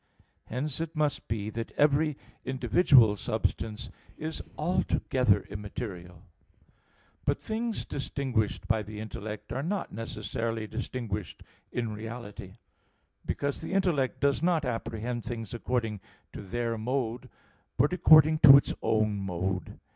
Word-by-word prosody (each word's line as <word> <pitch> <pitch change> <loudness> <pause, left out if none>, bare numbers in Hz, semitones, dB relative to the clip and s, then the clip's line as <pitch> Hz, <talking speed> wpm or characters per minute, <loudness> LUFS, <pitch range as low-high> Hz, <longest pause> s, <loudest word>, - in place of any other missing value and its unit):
Hence 135 +5 -3
it 165 0 -4
must 150 -1 0
be 105 -1 -2
that 115 +1 -5
every 150 0 +3 0.3
individual 130 - +5
substance 110 +1 -2 0.3
is 160 +1 -4 0.2
altogether 130 - +2
immaterial. 100 -4 -7 1.0
But - - 0
things 225 +1 -2
distinguished 130 -6 -2
by 110 -1 +2
the 105 0 -8
intellect 110 0 -6
are 130 - -1
not 190 +6 -2
necessarily 115 0 -3
distinguished 110 -3 -5 0.3
in 115 -3 -2
reality; 105 -3 -8 0.7
because 140 -1 -1
the - - -5
intellect 175 -9 +1
does 140 -1 +2
not 165 -3 +2
apprehend 120 0 -3
things 115 -3 -5
according 115 -3 -1 0.3
to - - -6
their 115 +3 -2
mode, 120 0 -2 0.5
but 145 +7 +3
according 155 -3 +7
to 140 -2 +11
its 140 - 0
own 110 -2 +1
mode. 95 0 -3
120 Hz, 120 wpm, -29 LUFS, 110-140 Hz, 1.0 s, to